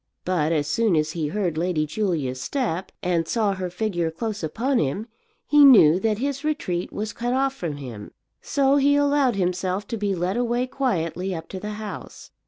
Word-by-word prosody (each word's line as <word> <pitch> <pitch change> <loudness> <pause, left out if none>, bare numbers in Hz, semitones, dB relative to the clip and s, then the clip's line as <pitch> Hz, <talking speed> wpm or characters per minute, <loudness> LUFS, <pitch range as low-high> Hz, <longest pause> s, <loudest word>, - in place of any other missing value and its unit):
But 165 -4 +1
as 150 -3 +1
soon 200 +6 +1
as 155 0 +1
he 160 -2 -2
heard 175 -2 -1
Lady 170 -3 0
Julia's 150 -8 -2
step, 190 - -2
and 170 -2 0
saw 215 -1 +1
her 185 -1 -4
figure 175 -3 -1
close 210 +6 -4
upon 235 - 0
him, 155 +10 -1 0.4
he 295 -1 +6
knew 185 - +8
that 215 0 0
his 275 +3 -2
retreat 290 - -2
was 210 0 -4
cut 240 +1 -2
off 270 0 +1
from 165 - -5
him. 120 -7 -8 0.3
So 280 -1 +2
he 285 +1 +4
allowed 285 -4 +3
himself 185 +1 -1
to 230 - -2
be 200 -2 -1
led 180 +4 -1
away 245 +1 0
quietly 190 - -2
up 165 0 -7
to 190 - -6
the 210 +2 -5
house. 215 -1 -8
195 Hz, 190 wpm, -24 LUFS, 165-240 Hz, 0.4 s, knew